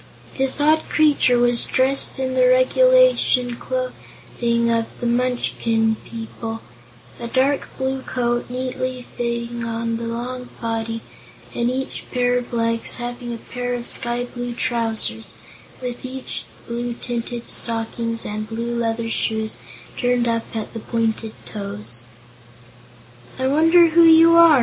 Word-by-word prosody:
This 270 +1 +2
odd 310 +2 +3
creature 295 -5 +4
was 240 0 +3
dressed 265 +2 +1
in 260 -1 -1
the 255 -1 +4
regulation 255 - +4
clothing 235 - -2
of 230 -1 +1
the 245 - -4
Munchkin 235 -2 +1
people, 225 0 -6 0.6
a 235 - -4
dark 270 +4 +1
blue 265 0 -1
coat 240 -2 -1
neatly 255 0 -3
fitting 235 0 -2
the 230 0 -2
long 250 +2 -5
body 225 0 -2 0.5
and 235 0 0
each 265 +1 -4
pair 245 -1 +1
of 245 - -9
legs 230 -1 0
having 245 0 -5
a 235 - -4
pair 245 +1 -4
of 240 -1 -5
sky 240 0 -2
blue 245 0 -5
trousers, 225 -3 -2 0.5
with 245 -1 -4 0.7
blue 240 +1 -3
tinted 240 0 -4
stockings 230 0 -3
and 215 +1 -4
blue 235 +1 -3
leather 230 0 -1
shoes 220 -1 -1 0.4
turned 245 -1 +2
up 230 0 -2
at 220 -1 -4
the 225 - -5
pointed 225 -1 -1
toes. 120 - -6 1.4
"I 260 - -1
wonder 330 +5 +5
who 335 +1 +6
you 330 +1 +8
are?" 335 -4 +8
240 Hz, 130 wpm, -21 LUFS, 230-255 Hz, 1.4 s, you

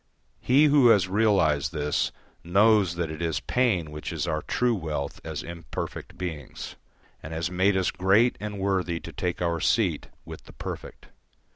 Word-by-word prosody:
He 140 +4 +4
who 145 -4 +5
has 100 -5 +5
realised 95 -8 +2
this 75 -2 -1 0.3
knows 100 0 +4
that 85 -2 -2
it 80 +1 -7
is 85 -1 -1
pain 100 -11 0
which 75 0 -6
is - - -2
our 80 -2 -1
true 125 +7 +1
wealth 75 -7 -4
as - - -5
imperfect 85 -4 -7
beings, 80 -6 -6 0.5
and 80 - -8
has 85 +2 -2
made 95 +2 +2
us 95 - +1
great 100 +6 +3
and 105 -1 -5
worthy 95 -4 0
to - - -9
take 90 0 -2
our 85 -1 0
seat - - +1 0.2
with - - -10
the - - -14
perfect. - - -8
90 Hz, 165 wpm, -26 LUFS, 80-105 Hz, 0.5 s, who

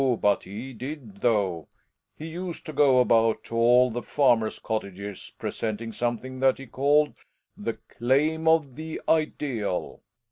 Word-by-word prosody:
but 100 -1 +3
he 115 +7 -7
did, 125 -4 -8
though; 95 -9 +1 0.5
he 155 - -7
used 170 +1 -6
to 155 - -6
go 135 -4 +5
about 115 -2 +3
to 115 - -7
all 125 +2 +5
the 120 +2 -3
farmers' 120 -7 +2
cottages 100 -2 -5
presenting 115 +1 -4
something 120 +3 -3
that 135 0 +3
he 135 - -9
called 145 +4 +2 0.3
" - - -54
the - - 0 0.3
claim 150 +7 +2
of 160 -5 +3
the 160 +1 -6
ideal. 135 - -1
125 Hz, 145 wpm, -26 LUFS, 110-145 Hz, 0.5 s, go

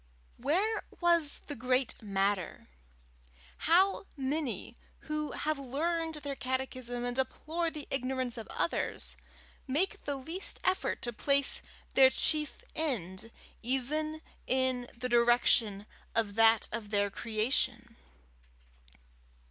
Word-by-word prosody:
Where 370 - +1 0.2
was 340 -4 +3
the - - -5
great 255 +1 +1
matter? 195 - -1 1.0
How 385 +4 +4
many 265 - -2 0.3
who 305 -1 -3
have 310 -1 -1
learned 320 +5 -1
their 285 -2 -4
catechism 255 -2 -3
and 245 0 -2
deplore 315 +6 -1
the 305 -3 -8
ignorance 255 -2 -1
of 225 -3 -7
others, - - -2 0.5
make 370 +9 0
the 285 - -1
least 325 +8 -3
effort 370 0 0
to 240 - -1
place 280 +4 +3 0.3
their 265 -1 +8
chief 300 +2 +1
end 225 - -3 0.3
even 305 +6 -1 0.2
in 260 -1 +1
the 250 +1 -2
direction 235 -4 +4 0.3
of 220 -3 +1
that 225 +1 +5
of 215 -2 -4
their 205 -1 +1
creation? 225 +4 0
260 Hz, 110 wpm, -31 LUFS, 235-305 Hz, 1.0 s, their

